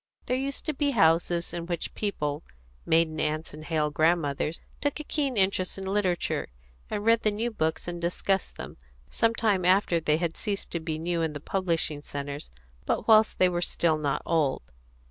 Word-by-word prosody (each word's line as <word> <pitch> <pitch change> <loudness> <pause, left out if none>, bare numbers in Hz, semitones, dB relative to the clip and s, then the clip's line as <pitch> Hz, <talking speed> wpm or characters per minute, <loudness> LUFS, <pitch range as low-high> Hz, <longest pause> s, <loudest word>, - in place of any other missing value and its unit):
There 250 - 0
used 275 +2 -3
to 310 - -1
be 285 0 +1
houses 170 0 +3
in 170 -1 -4
which 175 -2 -3
people, 150 -8 -2 0.5
maiden 160 -1 +3
aunts 155 0 -2
and 155 +1 -9
hale 155 -2 0
grandmothers, 155 -1 +1 0.2
took 290 +1 -1
a - - -4
keen 280 -5 -1
interest 190 -1 +1
in 195 - -5
literature, 190 -3 0 0.4
and 210 0 -3
read 230 0 +5
the 215 - +3
new 225 +3 -1
books 160 -7 -1
and 175 0 -4
discussed 185 +3 -1
them, - - -8 0.3
some 230 0 +2
time 205 -6 +2
after 180 -1 +4
they 155 -1 +2
had 165 -1 -2
ceased 205 -3 -3
to 170 - -1
be 160 -1 -3
new 170 +1 -1
in 160 -2 -1
the 145 - -5
publishing 165 -3 -1
centres, 145 0 -6 0.4
but - - 0
whilst 220 -1 +6
they 185 - +5
were 175 -1 -1
still 165 -2 +1
not 145 -2 -1
old. 150 - +1
175 Hz, 185 wpm, -27 LUFS, 155-205 Hz, 0.5 s, whilst